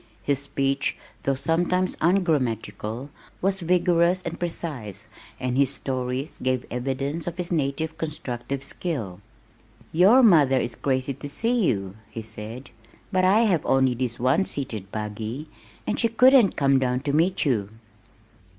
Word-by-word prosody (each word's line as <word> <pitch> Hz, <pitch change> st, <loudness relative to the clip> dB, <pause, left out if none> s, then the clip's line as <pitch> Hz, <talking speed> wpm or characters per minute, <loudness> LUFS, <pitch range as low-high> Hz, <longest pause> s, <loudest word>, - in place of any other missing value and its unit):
His 140 Hz, -2 st, +1 dB
speech 140 Hz, 0 st, -1 dB, 0.2 s
though 135 Hz, -, 0 dB
sometimes 175 Hz, +6 st, 0 dB
ungrammatical 130 Hz, -, 0 dB, 0.3 s
was 195 Hz, +1 st, +1 dB
vigorous 175 Hz, 0 st, +2 dB
and 170 Hz, 0 st, -5 dB
precise 130 Hz, -, -4 dB, 0.3 s
and 125 Hz, -1 st, -2 dB
his 140 Hz, 0 st, +2 dB
stories 130 Hz, +2 st, -3 dB
gave 130 Hz, -1 st, 0 dB
evidence 135 Hz, +6 st, -3 dB
of 175 Hz, 0 st, -4 dB
his 180 Hz, -1 st, -2 dB
native 160 Hz, +1 st, -1 dB
constructive 140 Hz, -4 st, -4 dB
skill. 125 Hz, -, -3 dB, 0.7 s
"Your 200 Hz, +11 st, +6 dB
mother 145 Hz, -, +5 dB
is 120 Hz, -2 st, -1 dB
crazy 130 Hz, 0 st, -1 dB
to 145 Hz, +2 st, -8 dB
see 225 Hz, +6 st, +1 dB
you," 95 Hz, -3 st, -2 dB
he 115 Hz, -, -7 dB
said, 110 Hz, +4 st, -8 dB, 0.4 s
"but 185 Hz, -1 st, +2 dB
I 195 Hz, +4 st, +5 dB
have 190 Hz, -9 st, +2 dB
only 130 Hz, -1 st, +3 dB
this 120 Hz, -1 st, -3 dB
one 130 Hz, +10 st, +2 dB
seated 110 Hz, -, -3 dB
buggy, 110 Hz, +7 st, -5 dB, 0.4 s
and 215 Hz, -, -1 dB
she 230 Hz, -, +4 dB
couldn't 250 Hz, -2 st, +5 dB
come 135 Hz, -1 st, +3 dB
down 125 Hz, -1 st, 0 dB
to 140 Hz, 0 st, -2 dB
meet 170 Hz, +5 st, +2 dB
you." 110 Hz, -8 st, 0 dB
140 Hz, 140 wpm, -25 LUFS, 125-175 Hz, 0.7 s, Your